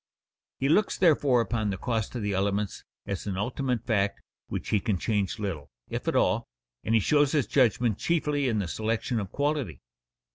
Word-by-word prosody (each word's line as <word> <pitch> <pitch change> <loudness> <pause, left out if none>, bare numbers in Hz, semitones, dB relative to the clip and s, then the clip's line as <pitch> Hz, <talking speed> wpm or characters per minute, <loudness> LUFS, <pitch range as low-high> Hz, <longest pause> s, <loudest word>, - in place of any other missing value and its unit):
He 135 - +1
looks 195 +8 +3
therefore 145 -8 +4
upon 110 -2 -1
the 95 - -2
cost 115 +2 -2
of 120 - -3
the 105 -1 -1
elements 100 +1 -1 0.2
as 100 +1 -4
an 95 -2 -2
ultimate 125 +2 -1
fact 100 -4 +1 0.3
which - - -4
he 105 - +3
can 105 -2 0
change 100 0 -1
little, 95 -9 -4 0.2
if - - -4
at - - +1
all, - - +2 0.4
and 115 - +1
he - - +6
shows 145 +5 +3
his 145 -6 +2
judgment 120 -3 +2
chiefly 150 -4 +1
in 115 -3 +1
the 100 -4 -1
selection 110 +5 -1
of 100 -3 -5
quality. 145 - -1
110 Hz, 185 wpm, -27 LUFS, 100-135 Hz, 0.4 s, he